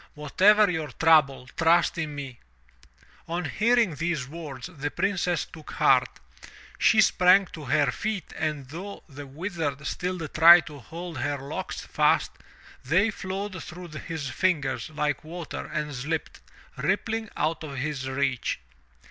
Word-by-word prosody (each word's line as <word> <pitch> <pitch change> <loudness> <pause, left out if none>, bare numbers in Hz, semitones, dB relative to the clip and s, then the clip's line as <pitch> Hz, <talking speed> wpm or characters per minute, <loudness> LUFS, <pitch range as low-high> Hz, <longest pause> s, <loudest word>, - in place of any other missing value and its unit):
Whatever 200 +8 +4
your 160 -4 -2
trouble, 145 -2 +3
trust 170 +1 +3
in 150 -2 -3
me!" 135 -4 -7 0.9
On 170 +1 -2
hearing 225 +3 +2
these 155 -3 -2
words, 145 -4 -8
the 145 0 -3
Princess 180 -2 0
took 155 -2 -12
heart. - - +4 0.7
She - - +5
sprang 185 +2 +5
to 155 -3 -8
her 145 +1 +2
feet 215 -6 -4
and 150 -4 -3
though 190 +7 -8
the 145 -1 -10
Wizard 150 -2 -4
still 180 -1 -3
tried 165 +3 +8
to 150 -2 -10
hold 165 +4 -8
her 145 - -1
locks 135 +1 -5
fast, - - +2 0.5
they 185 - +2
flowed 190 -1 -5
through 175 +1 -9
his 155 -1 -5
fingers 135 -5 0
like 150 -2 -2
water 165 +1 -6
and 150 -1 -3
slipped, 145 +5 -4 0.4
rippling, 225 -1 -1
out 160 +2 -1
of 145 -3 -7
his 135 -1 -3
reach. 130 -2 -1
160 Hz, 140 wpm, -26 LUFS, 140-180 Hz, 0.9 s, tried